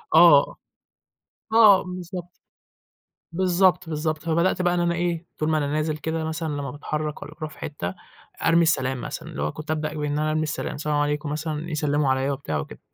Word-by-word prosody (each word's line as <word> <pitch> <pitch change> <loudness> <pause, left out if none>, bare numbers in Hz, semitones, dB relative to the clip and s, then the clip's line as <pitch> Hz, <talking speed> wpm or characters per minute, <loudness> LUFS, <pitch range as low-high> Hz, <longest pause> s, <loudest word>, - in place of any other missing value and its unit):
آه، 160 -4 +7 1.0
آه، 215 -4 +7
بالضبط. 180 -1 -6 1.1
بالضبط، 180 -1 +2
بالضبط. 155 0 -2
فبدأت 170 +3 +1
بَقى 175 0 +2
إن 175 - +1
أنا 170 0 +1
إيه، 170 -1 -1
طول 155 +1 0
ما 155 - +2
أنا 145 -1 0
نازل 155 +1 -1
كده 160 +1 -3
مثلًا 160 +1 -3
لمّا 140 -2 -4
باتحرك 150 +1 -4
والَّا - - -8
أرُوح 155 -2 -5
في - - -15
حتّة، 95 - -4 0.5
أرمي 165 +1 +5
السلام 130 -5 +1
مثلًا، - - -6
اللي - - -6
هو 75 - 0
كنت 155 +1 -6
أبدأ 155 -1 -2
بإن 150 -1 -2
أنا 155 0 +1
أرمي 155 0 +1
السلام 150 -1 -3
سلام 150 0 -1
عليكم 145 0 0
مثلًا 155 +2 -3
يسلمّوا 150 -2 +1
عليَّ 130 +1 +1
وبتاع 135 - -3
وكده، - - -8
155 Hz, 185 wpm, -24 LUFS, 150-170 Hz, 1.1 s, آه